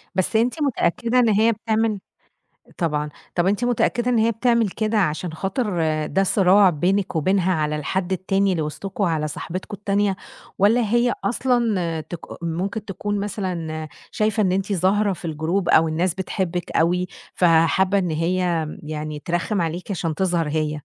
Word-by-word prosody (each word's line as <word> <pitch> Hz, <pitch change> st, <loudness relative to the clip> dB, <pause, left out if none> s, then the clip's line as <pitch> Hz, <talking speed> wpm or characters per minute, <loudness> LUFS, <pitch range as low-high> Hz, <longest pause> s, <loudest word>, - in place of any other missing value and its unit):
بس 185 Hz, +3 st, 0 dB
أنتِ 245 Hz, +7 st, +1 dB
متأكدة 240 Hz, -2 st, +1 dB
إن 235 Hz, -2 st, +4 dB
هي 220 Hz, +2 st, +4 dB
بتعمل 220 Hz, -1 st, 0 dB, 0.8 s
طبعًا، 150 Hz, -3 st, -1 dB, 0.3 s
طَب 175 Hz, 0 st, +2 dB
أنتِ 205 Hz, +5 st, +1 dB
متأكدة 245 Hz, 0 st, +1 dB
إن 240 Hz, -, +2 dB
هي 225 Hz, +1 st, +3 dB
بتعمل 235 Hz, -1 st, +2 dB
كده 215 Hz, +3 st, -1 dB
عشان 165 Hz, -1 st, -1 dB
خاطر 190 Hz, +2 st, -2 dB, 0.3 s
ده 195 Hz, -, +1 dB
صراع 195 Hz, 0 st, +5 dB
بينك 180 Hz, +4 st, 0 dB
وبينها 185 Hz, +3 st, +2 dB
على 150 Hz, -1 st, 0 dB
الحد 175 Hz, +5 st, -2 dB
التاني 195 Hz, +1 st, +1 dB
اللي 170 Hz, -, -1 dB
وسطكم، 185 Hz, +7 st, -4 dB
على 160 Hz, -4 st, 0 dB
صاحبتكم 185 Hz, +6 st, -6 dB
التانية، 200 Hz, -1 st, 0 dB, 0.4 s
والّا 220 Hz, +5 st, +4 dB
هي 240 Hz, +3 st, +2 dB
أصلًا 210 Hz, -8 st, 0 dB
تك 170 Hz, +2 st, -8 dB, 0.2 s
ممكن 190 Hz, +6 st, -3 dB
تكون 205 Hz, +1 st, -3 dB
مثلًا 175 Hz, -6 st, -4 dB, 0.2 s
شايفة 215 Hz, +1 st, +1 dB
إن 185 Hz, -, +2 dB
أنتِ 195 Hz, +2 st, -1 dB
ظاهرة 195 Hz, +3 st, +2 dB
في 175 Hz, -, -9 dB
الجروب 165 Hz, +4 st, -1 dB
أو 160 Hz, +1 st, +5 dB
الناس 165 Hz, +3 st, 0 dB
بتحبِك 180 Hz, -2 st, -3 dB
أوي، 180 Hz, +2 st, +1 dB, 0.3 s
فحابة 175 Hz, +3 st, +3 dB
إن 180 Hz, -4 st, 0 dB
هي 170 Hz, 0 st, 0 dB, 0.2 s
يعني 150 Hz, 0 st, -5 dB
ترخم 175 Hz, +4 st, -1 dB
عليكِ 170 Hz, +4 st, -3 dB
عشان 165 Hz, -4 st, -2 dB
تظهر 175 Hz, -3 st, 0 dB
هي؟ 155 Hz, 0 st, 0 dB
190 Hz, 155 wpm, -22 LUFS, 165-210 Hz, 0.8 s, صراع